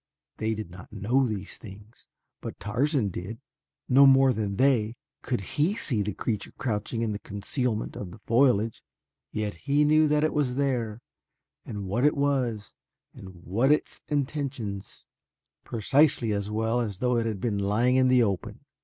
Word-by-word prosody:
They 110 0 -1
did 105 -5 -6
not 95 +2 -12
know 125 +6 +1
these 100 -3 -5
things, 105 +2 -13 0.3
but - - -7
Tarzan 125 +2 0
did. 95 +5 -6 0.5
No 135 +2 +7
more 135 -1 +6
than 105 -3 -2
they 120 -3 +2 0.3
could 120 -5 -2
he 150 - 0
see 125 - 0
the 105 +1 -1
creature 110 -4 -3
crouching 115 0 -2
in 110 - -1
the 105 - -4
concealment 110 +3 -3
of 100 - -6
the 95 - -11
foliage, 115 -3 +2 0.5
yet 105 -1 -2
he 145 - +1
knew 155 +1 +5
that 150 0 +2
it 155 - +1
was 140 -5 0
there 120 -5 -1 0.7
and 100 -2 -5
what 105 +7 -1
it 150 0 +3
was 130 -7 0 0.4
and 95 -3 -12
what 115 +11 +2
its 150 - 0
intentions, 130 - -3 0.6
precisely 130 +1 +2
as 100 0 -2
well 110 +2 0
as 105 -5 -3
though 125 +3 +1
it 115 -1 0
had 105 -3 -3
been 105 -2 -1
lying 110 +6 +2
in 130 0 +4
the 125 -1 +5
open. 100 -5 -3
115 Hz, 165 wpm, -27 LUFS, 105-135 Hz, 0.7 s, No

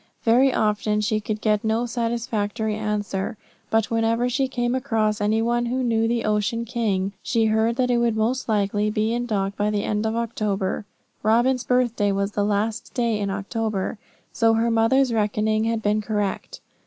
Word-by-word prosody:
Very 255 +3 +4
often 210 -1 +1
she 215 0 0
could 215 0 -4
get 210 -1 +1
no 220 +2 +1
satisfactory 230 -2 -2
answer, 210 -2 -2 0.3
but 225 0 +1
whenever 230 +2 +1
she 265 +2 0
came 240 -2 -1
across 220 -5 0
any 215 +2 +2
one 240 +1 0
who 255 +2 -1
knew 225 -2 +1
the 235 0 0
Ocean 215 +2 0
King, 205 -5 -1
she 230 -2 +1
heard 220 +1 +2
that 250 0 +1
it 240 - +2
would 235 -2 +1
most 240 +4 0
likely 205 0 +1
be 215 +1 0
in 240 0 -2
dock 200 -3 -1
by 205 +1 0
the 210 -1 -1
end 210 +1 -1
of 220 - -2
October. 210 -4 -2 0.4
Robin's 240 +4 +2
birthday 240 -5 +1
was 200 +1 -1
the 205 - 0
last 210 +2 -1
day 235 -3 +1
in 200 -1 -1
October, 200 +1 -3 0.3
so 225 -1 +3
her 230 +1 +1
mother's 235 +3 +3
reckoning 215 0 +1
had 225 -1 -1
been 210 +1 +1
correct. 210 -2 -3
220 Hz, 180 wpm, -23 LUFS, 210-235 Hz, 0.4 s, Very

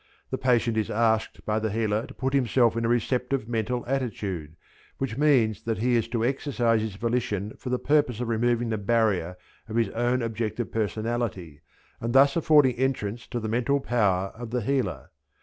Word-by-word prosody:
The - - -1
patient 120 -3 +2
is 110 - 0
asked 110 0 0
by 105 0 0
the 110 0 -1
healer 110 0 -1
to - - -11
put 130 +1 -2
himself 125 -3 +3
in 115 - -1
a - - +1
receptive 125 +1 0
mental 120 +1 -2
attitude, 100 - -3 0.4
which 135 -5 -3
means 130 -8 +3
that 115 -1 -2
he 120 +3 +1
is 115 - +1
to 115 -1 -1
exercise 120 -4 +1
his 110 -3 -4
volition 110 -2 -2
for 125 - -6
the 125 - +1
purpose 145 -4 +1
of 125 - -2
removing 120 +1 +1
the 110 -2 -1
barrier 100 -5 +1 0.3
of 110 - -5
his 115 -3 +2
own 120 +2 0
objective 115 0 -3
personality 110 -7 -3 0.4
and 115 +1 -3
thus 140 +1 +6
affording 150 -6 +4
entrance 120 -4 -2
to 120 - -3
the 110 - -4
mental 125 +5 +1
power 100 -7 +1
of 120 0 -8
the 125 +1 -1
healer. 135 +3 -2
115 Hz, 185 wpm, -26 LUFS, 110-125 Hz, 0.4 s, thus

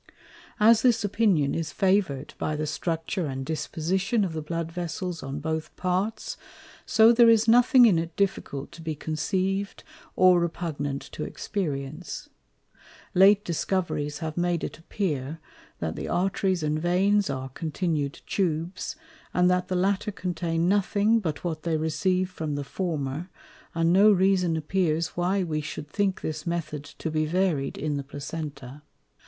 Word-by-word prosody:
As 220 +1 +6
this 240 -3 +3
Opinion 195 -9 +2
is 165 -1 -2
Favour'd 185 -8 +1
by 155 - -1
the 155 +1 -2
Structure 165 +2 -2
and 135 -1 -4
Disposition 185 - 0
of 175 - -4
the 160 - -3
Blood 165 +1 -4
Vessels 175 0 -4
on 135 +1 -5
both 160 +1 -3
Parts, 185 +4 -2 0.5
so 225 +1 +6
there 235 0 +6
is 225 0 +4
nothing 245 +2 +7
in 190 -8 +5
it 165 0 -5
difficult 165 -8 -2
to 170 -1 -11
be 160 -1 -3
conceiv'd, 190 +6 -2 0.3
or 185 -1 +6
repugnant 155 -5 -3
to 150 - -5
Experience. 150 -5 -4 0.8
Late 200 +2 +6
Discoveries 170 -4 -1
have 160 -1 -5
made 175 -1 0
it - - -5
appear, 160 -5 -3 0.4
that 80 -1 -3
the - - -5
Arteries 190 -1 0
and 155 0 0
Veins 195 +3 +2
are 135 -1 -3
continu'd 155 -1 -2
Tubes, 175 - -2 0.4
and 180 0 +4
that 180 0 +1
the 185 - -2
latter 195 +3 +1
contain 175 -3 -1
nothing 205 +3 +3
but 160 -8 -4
what 160 -3 -3
they 165 -1 0
receive 160 +4 0
from 160 -5 -4
the 145 - -3
former, 155 0 -3 0.5
and 165 +1 +3
no 205 +3 +7
Reason 185 -3 +3
appears 160 0 0
why 185 +2 0
we 155 -3 -2
shou'd 150 0 -7
think 195 +3 0
this 155 +1 -4
Method 155 -4 -3
to 160 - -6
be 155 0 0
varied 170 -5 0
in 150 -1 -2
the 140 - -3
Placenta. 145 -1 -7
170 Hz, 150 wpm, -26 LUFS, 155-190 Hz, 0.8 s, nothing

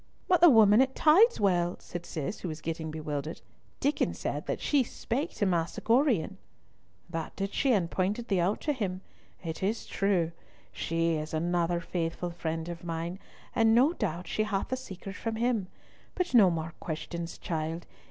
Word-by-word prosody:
"But 360 -2 +4
the 345 - +10
woman 220 -2 +7
at 265 0 +1
Tideswell," 205 - +4
said 175 0 -7
Cis, 170 +6 -4
who - - -5
was 155 -1 -5
getting 160 0 -4
bewildered—"Diccon 155 - -3
said - - -4
that - - -1
she 285 -3 +2
spake 260 +6 -3
to 205 - +1
Master 170 -3 0
Gorion." 230 - +2 0.7
"That 165 -2 -5
did 195 0 -3
she, 270 - +2
and 195 -7 +2
pointed 205 +5 -1
thee 195 -3 +1
out 185 +5 +1
to 300 - 0
him. 190 -7 -3 0.4
It 160 -2 -5
is 210 +4 -1
true. 185 -5 +1 0.4
She 165 0 0
is 155 0 -3
another 170 +1 +1
faithful 170 0 -3
friend 165 -1 -3
of 170 -1 -6
mine, 170 +2 -4 0.3
and 225 -1 +4
no 270 +7 +5
doubt 175 - -3
she - - -1
had 205 -2 -1
the 260 - 0
secret 195 -6 -8
from 225 -1 -3
him. 225 -4 0 0.5
But 360 -3 -1
no 210 -6 +7
more 165 -1 -3
questions, 170 +1 -5
child. 165 +1 -3
185 Hz, 170 wpm, -29 LUFS, 165-225 Hz, 0.7 s, the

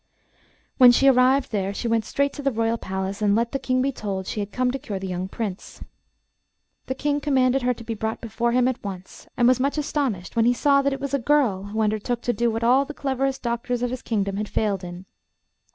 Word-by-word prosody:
When 250 -2 +9
she 270 +3 +3
arrived 260 +1 +4
there 200 -2 -2
she 235 - -3
went 230 -1 +1
straight 280 +3 0
to - - -7
the 275 -1 +1
Royal 230 0 0
palace, 190 +2 -4
and 205 -1 +3
let 235 +1 0
the 275 - -2
King 255 -1 0
be 275 - +1
told 195 -6 -4
she 215 - -4
had 205 0 -4
come 250 +2 0
to 270 - -4
cure 205 -5 -5
the 190 - -6
young 185 0 -3
Prince. 200 -2 -6 1.0
The 260 - -2
King 290 +1 -1
commanded 265 -2 +2
her 250 0 +1
to 230 - -11
be 225 0 -4
brought 220 0 -3
before 235 +1 -1
him 250 +1 +3
at 255 0 -3
once, 190 -2 -8
and 240 -2 +4
was 255 0 +4
much 280 +3 0
astonished 270 -12 -2
when 230 -1 +3
he 245 +1 +3
saw 280 +2 +3
that 280 0 +1
it 270 - -5
was 280 -1 -4
a 280 - +2
girl 240 -8 +1
who 215 +2 -3
undertook 215 +3 -1
to 245 - 0
do 235 +2 +1
what 225 +1 -2
all 255 +4 +4
the 295 +1 -9
cleverest 270 -1 -2
doctors 240 +1 -2
of 245 - -1
his 255 - -5
kingdom 200 -3 -2
had 210 0 -3
failed 200 -4 -1
in. 175 +1 -8
235 Hz, 240 wpm, -24 LUFS, 210-265 Hz, 1.0 s, When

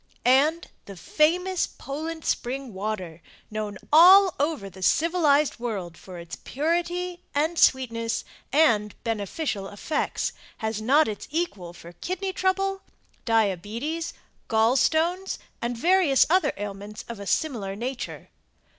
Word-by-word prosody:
And 290 +7 +3 0.2
the 200 - -9
famous 350 - +1
Poland 315 +4 -6
Spring 260 -1 -2
Water, 190 -5 -4 0.3
known 215 -2 -4 0.2
all 370 +3 +8
over 290 -8 -1
the 190 0 -12
civilized 300 - +3
world 200 -8 -4
for 180 +1 -11
its 170 -1 -8
purity 345 +4 -2
and 315 +4 +1
sweetness 230 -3 +2 0.3
and 225 -9 +3
beneficial 215 - -3
effects, 205 +10 -2 0.2
has 220 -1 -3
not 285 +8 +4
its 210 -2 -5
equal 285 - -3
for 170 -1 -12
kidney 375 - -4
trouble, 390 +1 0 0.4
diabetes, 225 - -1 0.3
gall 225 +2 +3
stones, 340 +7 +1 0.2
and 235 0 -2
various 340 -1 +4
other 370 +1 +3
ailments 205 +1 -7
of 235 -3 -7
a 200 - -7
similar 215 -11 -1
nature. 245 +4 -5
260 Hz, 120 wpm, -25 LUFS, 210-330 Hz, 0.4 s, all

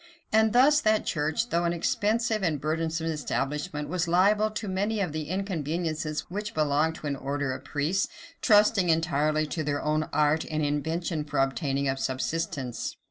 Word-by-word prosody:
And 220 0 +4
thus 280 +6 +5
that 215 0 +2
church, 160 +9 -1
though 170 +1 +1
an 170 0 +1
expensive 215 +6 0
and 160 -6 0
burdensome 160 +2 -1
establishment, 150 0 -2
was 175 +2 -1
liable 205 +5 +3
to 215 0 -5
many 200 +3 -1
of 185 -5 -1
the 155 0 -3
inconveniences 160 -4 -2
which 205 +3 -6
belong 155 +1 +2
to 160 - -10
an 145 -1 -1
order 140 0 -2
of 130 +1 -8
priests, 155 +7 0 0.3
trusting 210 -4 +4
entirely 155 -1 +2
to 155 +1 -3
their 145 -1 -1
own 155 0 0
art 150 +1 +2
and 155 -1 0
invention 160 +2 -1
for 145 - -5
obtaining 135 +1 0
a 135 0 0
subsistence. 130 -2 -3
160 Hz, 165 wpm, -27 LUFS, 150-190 Hz, 0.3 s, thus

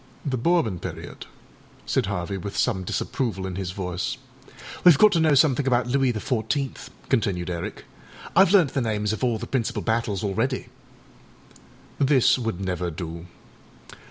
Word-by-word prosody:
â - - +1
âThe 130 -2 -2
Bourbon 120 - +2
period,â - - -8 0.6
said - - 0
Harvey, 100 -1 -3
with 100 +1 -6
some 95 - +1
disapproval 95 0 -2
in 95 - -4
his 95 -2 -3
voice. 90 -1 -3 0.7
âWeâve 175 -5 +8
got 215 +6 +6
to 170 - +2
know 155 -2 +4
something 140 -1 +3
about 125 -2 +2
Louis 130 +1 +2
the 110 - -3
Fourteenth,â 130 +4 -2 0.2
continued 95 -8 0
Eric; 85 -1 -5 0.5
âIâve 190 0 +6
learnt 180 -9 +4
the 140 - 0
names 105 -2 -1
of 110 - -5
all 120 -3 +1
the - - -6
principal 120 -4 -2
battles 110 -4 -1
already.â 100 -2 -1 1.3
This 135 -2 +4
would 115 -6 -3
never 90 -2 -2
do. 85 +1 -7
110 Hz, 155 wpm, -24 LUFS, 95-135 Hz, 1.3 s, âWeâve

